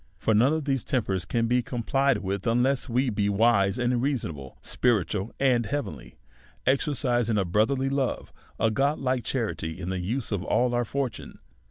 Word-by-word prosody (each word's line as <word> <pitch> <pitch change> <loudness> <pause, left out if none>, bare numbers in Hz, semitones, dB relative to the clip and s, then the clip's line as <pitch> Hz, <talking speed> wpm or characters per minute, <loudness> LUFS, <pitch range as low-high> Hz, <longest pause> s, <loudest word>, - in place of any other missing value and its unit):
For 110 - +1
none 120 +6 +4
of 155 -2 -1
these 135 -3 0
tempers 95 -8 -1
can 115 +6 0
be 125 +2 +2
complied 135 +2 0
with 100 +2 -3
unless 125 +4 +1
we 125 +2 +1
be 100 -1 0
wise 100 -1 +3
and 120 -1 +1
reasonable, 85 - -3
spiritual 105 -3 0
and 125 -5 +2
heavenly, 75 - -5 0.5
exercising 125 -4 +1
a 100 - +1
brotherly 110 +9 +1
love, 135 -1 -2 0.3
a 110 - +2
godhke 135 -1 0
cha - - -2
rity, 80 -7 -4
in 90 0 -5
the 95 - -2
use 115 +8 -2
of 100 -3 -1
all 120 +4 +1
our 120 0 +1
fortune. 130 -2 -4
120 Hz, 170 wpm, -26 LUFS, 100-135 Hz, 0.5 s, none